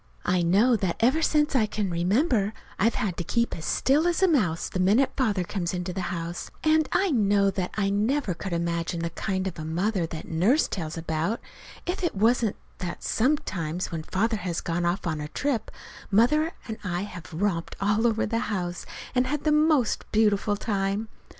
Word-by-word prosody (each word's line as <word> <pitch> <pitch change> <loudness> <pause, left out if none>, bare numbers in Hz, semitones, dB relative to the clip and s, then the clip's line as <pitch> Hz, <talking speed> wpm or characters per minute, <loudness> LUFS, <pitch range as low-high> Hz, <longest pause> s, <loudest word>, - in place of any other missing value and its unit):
I 180 0 +2
know 200 +9 +4
that 190 -4 -1
ever 260 +8 +3
since 300 -2 +2
I 220 -5 +4
can 210 -3 -2
remember 205 - +1 0.3
I've 225 +4 +3
had 185 -5 -2
to 175 - -2
keep 235 +7 0
as 160 - -7
still 295 +5 +2
as 350 +2 +1
a - - +7
mouse 205 - +1
the 185 - -4
minute 210 +9 +4
Father 210 -9 +1
comes 175 -1 -3
into 180 0 -3
the 190 - -3
house; 170 0 -4
and 315 0 +3
I 390 -2 +2
know 200 -5 +3
that 185 -2 -2
I 200 -1 +1
never 215 +2 +1
could 190 +3 -6
imagine 170 0 -1
the 170 0 -2
kind 190 +2 -2
of 185 -4 -4
a - - -4
mother 175 +3 0
that 160 -1 -7
Nurse 195 - +3
tells 165 -3 -4
about, 165 +6 -1 0.5
if 360 +2 -3
it 345 - 0
wasn't 225 +1 +2 0.2
that 180 -1 -5
sometimes 185 - 0
when 165 -2 -3
Father 220 +7 0
has 180 -3 -3
gone 170 +1 -1
off 175 +3 -1
on 155 -3 -2
a 150 - -4
trip, 255 - -2 0.4
Mother 300 - +3
and 220 -1 -5
I 175 -2 -2
have 180 -5 -8
romped 170 0 -1
all 210 +4 +2
over 225 -1 +1
the 230 +2 -1
house, 175 -4 -3 0.3
and 255 0 +2
had 295 +2 -2
the 305 - +2
most 300 -5 +2
beautiful 210 -1 +2
time. 200 +1 -1
200 Hz, 195 wpm, -26 LUFS, 175-240 Hz, 0.5 s, a